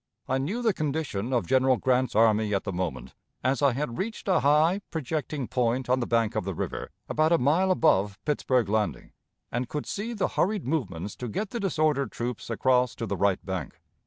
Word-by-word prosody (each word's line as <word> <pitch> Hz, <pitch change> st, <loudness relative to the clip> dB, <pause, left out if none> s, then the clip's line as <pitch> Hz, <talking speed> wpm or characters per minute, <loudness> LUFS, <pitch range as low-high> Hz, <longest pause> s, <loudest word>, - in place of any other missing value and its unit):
I 130 Hz, +1 st, +1 dB
knew 205 Hz, -, -2 dB
the 220 Hz, -3 st, +3 dB
condition 145 Hz, -, -2 dB
of 120 Hz, -7 st, +1 dB
General 130 Hz, +5 st, +3 dB
Grant's 130 Hz, -1 st, +1 dB
army 110 Hz, -1 st, +3 dB
at 95 Hz, -, -1 dB
the 100 Hz, -, -4 dB
moment, 90 Hz, -2 st, -4 dB, 0.3 s
as 130 Hz, +2 st, +1 dB
I 140 Hz, -3 st, +4 dB
had 130 Hz, -2 st, -3 dB
reached 215 Hz, +2 st, -4 dB
a 190 Hz, -, +4 dB
high, 155 Hz, +7 st, +3 dB
projecting 150 Hz, -3 st, -3 dB
point 125 Hz, 0 st, 0 dB
on 130 Hz, -, +3 dB
the 120 Hz, -, -2 dB
bank 115 Hz, -1 st, +1 dB
of -, -, 0 dB
the 95 Hz, -1 st, -4 dB
river, -, -, -4 dB, 0.2 s
about 155 Hz, +1 st, +2 dB
a 170 Hz, -, +6 dB
mile 165 Hz, +9 st, +2 dB
above 105 Hz, -, +3 dB
Pittsburg 130 Hz, -5 st, +1 dB
Landing, 105 Hz, +1 st, -1 dB, 0.4 s
and 120 Hz, 0 st, -2 dB
could 150 Hz, -, -3 dB
see 220 Hz, +4 st, -4 dB
the 205 Hz, -, 0 dB
hurried 205 Hz, 0 st, 0 dB
movements 100 Hz, -, -2 dB
to 125 Hz, -, -5 dB
get 200 Hz, -, -3 dB
the 235 Hz, -, -3 dB
disordered 155 Hz, -8 st, +1 dB
troops 120 Hz, -1 st, -4 dB
across 125 Hz, +1 st, +2 dB
to 115 Hz, -, -4 dB
the 100 Hz, -, -2 dB
right 100 Hz, 0 st, +1 dB
bank. 95 Hz, -7 st, -5 dB
130 Hz, 200 wpm, -27 LUFS, 110-155 Hz, 0.4 s, a